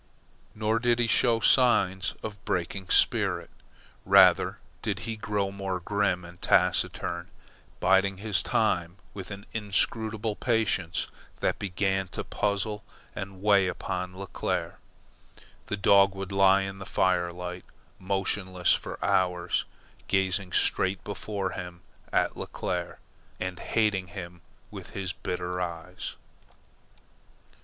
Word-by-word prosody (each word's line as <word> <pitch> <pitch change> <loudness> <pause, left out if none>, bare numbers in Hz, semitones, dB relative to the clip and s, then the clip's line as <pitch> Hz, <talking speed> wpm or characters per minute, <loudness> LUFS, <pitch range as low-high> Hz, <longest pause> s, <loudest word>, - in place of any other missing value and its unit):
Nor 110 +1 +1
did 120 0 +2
he 120 - +2
show 115 0 +3
signs 100 -7 +3
of 110 - -4
a - - -21
breaking 90 0 -3
spirit. - - +3 0.5
Rather - - +6 0.2
did 100 -3 -2
he 115 -1 -4
grow 105 -2 -1
more 95 -2 -3
grim 95 -1 0
and 85 +1 -13
taciturn, 85 -1 +1 0.5
biding 95 +1 +3
his 105 0 +2
time 90 -5 0 0.2
with 95 -2 -7
an 100 0 -8
inscrutable 110 +1 -1
patience 105 -9 0 0.3
that - - 0
began 95 0 0
to - - -5
puzzle 105 +1 -1 0.3
and 95 -1 -7
weigh 100 -3 +5
upon 90 0 -4
Leclere. 100 0 -3 0.9
The 105 - -2
dog 100 0 +5
would 95 -1 -5
lie 95 0 +5
in 95 0 -6
the 95 - -8
firelight, 90 0 0 0.3
motionless, 95 -1 0
for - - -3
hours, 90 -1 +1 0.4
gazing 95 -1 +1
straight 95 0 +1
before 100 -2 -3
him 90 -1 -7 0.3
at - - +1
Leclere, 90 -1 -4 0.4
and 90 -1 -4
hating 105 -4 +1
him 85 -1 -8 0.3
with - - -10
his 95 -1 -2
bitter 90 0 -3
eyes. 85 +1 -5
95 Hz, 120 wpm, -28 LUFS, 90-105 Hz, 0.9 s, Rather